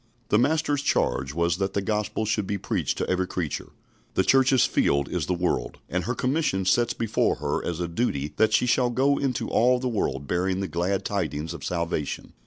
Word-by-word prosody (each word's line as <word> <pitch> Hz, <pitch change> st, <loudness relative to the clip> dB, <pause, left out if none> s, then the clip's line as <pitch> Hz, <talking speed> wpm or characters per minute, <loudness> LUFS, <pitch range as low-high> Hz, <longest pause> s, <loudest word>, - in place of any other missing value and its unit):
The 105 Hz, -, +4 dB
Master's 145 Hz, +1 st, +1 dB
charge 70 Hz, -, 0 dB
was 85 Hz, +2 st, 0 dB
that 95 Hz, 0 st, -1 dB
the -, -, +2 dB
Gospel 105 Hz, +1 st, -1 dB
should 105 Hz, -2 st, 0 dB
be 100 Hz, -, -1 dB
preached -, -, -2 dB
to -, -, -2 dB
every 95 Hz, 0 st, 0 dB
creature. 85 Hz, -7 st, -4 dB, 0.5 s
The -, -, +3 dB
Church's 130 Hz, -1 st, +4 dB
field 70 Hz, 0 st, +1 dB
is 85 Hz, -5 st, -2 dB
the 90 Hz, -, +1 dB
world, 85 Hz, -9 st, -1 dB
and 90 Hz, -1 st, -1 dB
her 125 Hz, +4 st, -1 dB
commission 125 Hz, -, 0 dB
sets 120 Hz, +6 st, +2 dB
before 115 Hz, -2 st, +1 dB
her 75 Hz, -1 st, -2 dB
as 85 Hz, -1 st, -3 dB
a 90 Hz, -, -1 dB
duty 85 Hz, -, -2 dB
that 110 Hz, -1 st, +4 dB
she 115 Hz, -, +3 dB
shall 125 Hz, 0 st, +2 dB
go 135 Hz, +4 st, +2 dB
into 135 Hz, -3 st, -1 dB
all 125 Hz, +2 st, +4 dB
the 130 Hz, +1 st, -2 dB
world 100 Hz, -, -1 dB
bearing 90 Hz, +4 st, 0 dB
the 95 Hz, -, -2 dB
glad 90 Hz, +3 st, -1 dB
tidings 80 Hz, +3 st, -2 dB
of 85 Hz, -, -9 dB
salvation. 85 Hz, -4 st, -3 dB
95 Hz, 200 wpm, -25 LUFS, 85-120 Hz, 0.5 s, The